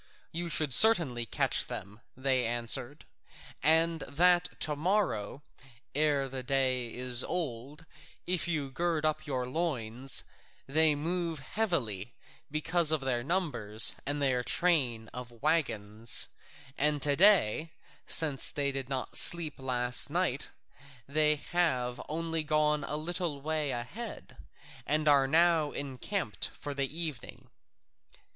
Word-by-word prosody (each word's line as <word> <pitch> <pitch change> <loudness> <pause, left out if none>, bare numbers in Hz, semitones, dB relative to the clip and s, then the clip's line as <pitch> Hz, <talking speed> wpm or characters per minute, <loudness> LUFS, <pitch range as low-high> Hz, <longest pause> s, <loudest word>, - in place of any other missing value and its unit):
"You 170 +1 -4
should 155 -4 +1
certainly 150 - +5
catch - - 0
them," 100 +3 -7 0.2
they 130 -1 +1
answered, 120 +4 -2 0.6
"and 165 +2 +3
that 175 +4 +1
to 150 -1 +1
morrow, 150 - -1 0.5
ere 145 -2 +1
the 130 0 -6
day 130 -2 0
is 125 0 +1
old, 150 -2 -5 0.4
if 180 -1 -1
you 150 -5 -2
gird 165 +1 -1
up 155 0 -2
your 130 -3 -2
loins: 130 -4 -1 0.4
they 155 +2 +3
move 165 +2 -3
heavily 130 - -3 0.3
because 160 +2 +2
of 155 -2 +1
their 125 -3 -1
numbers 130 - +2
and 145 +1 -3
their 125 -2 +1
train 130 -10 0
of 125 -1 -8
waggons, 115 -6 -1 0.5
and 150 +1 +2
to 145 -1 +3
day, 165 - +3 0.4
since 150 -5 +2
they 140 -1 -1
did 135 -1 -5
not 130 -2 -4
sleep 165 -4 +7
last 125 0 0
night, 165 -4 -1 0.6
they 150 +2 +3
have 145 -6 -1
only 165 +1 -2
gone 150 -1 0
a 150 - -4
little 165 -1 -3
way 155 0 -2
ahead, 135 - -7 0.5
and 155 +2 +1
are 140 -2 +5
now 165 0 +3
encamped 140 - -4
for 145 - -6
the 140 -1 -2
evening." 155 -6 -6
145 Hz, 125 wpm, -30 LUFS, 125-165 Hz, 0.6 s, sleep